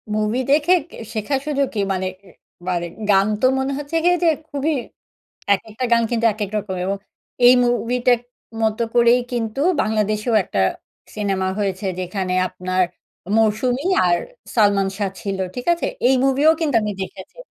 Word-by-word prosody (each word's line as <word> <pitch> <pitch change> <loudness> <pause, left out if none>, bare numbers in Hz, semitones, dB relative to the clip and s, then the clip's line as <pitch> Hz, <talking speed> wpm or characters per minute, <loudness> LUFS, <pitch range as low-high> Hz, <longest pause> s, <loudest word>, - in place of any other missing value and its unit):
Movie 215 +3 0
দেখে 305 +5 +4 0.2
কে - - -12 0.2
শেখা 220 +6 -1
শুধু 290 -2 -1
কি 215 - -2
মানে, 185 0 -2 0.2
এ - - -15 0.4
মানে 175 -1 -1 0.2
গান 195 0 +5
তো - - +3
মনে 265 +1 -1
হচ্ছে 290 +2 -6
গিয়ে 355 +1 +4
যে - - +4 0.2
খুবই 285 +3 -1 0.8
একেকটা 220 +4 -2
গান 235 0 +5
কিন্তু 230 -1 +1
একেক 205 -2 -4
রকম 205 -2 -3
এবং 195 +2 -1 0.5
এই 250 - +9
মুভিটার 245 0 +2 0.4
মতো 220 +1 +1
করেই 240 +1 +5
কিন্তু 230 +1 -2 0.2
বাংলাদেশেও 215 +1 0
একটা 100 - -2 0.6
সিনেমা 195 -3 -1
হয়েছে, 195 -1 -2
যেখানে 185 0 -3 0.2
আপনার 185 0 -1 0.5
'মৌসুমি' 245 - +1 0.2
আর 175 -1 +3 0.4
'সালমান 200 -3 +3
শাহ' 195 -2 -1
ছিল, 195 -1 -3 0.2
ঠিক 250 - -6
আছে? 340 - -1 0.2
এই 265 - +4
মুভিও 275 +3 +4
কিন্তু 295 -6 +1
আমি 210 0 -2
দেখেছি। 190 0 -8
215 Hz, 155 wpm, -21 LUFS, 195-250 Hz, 0.8 s, এই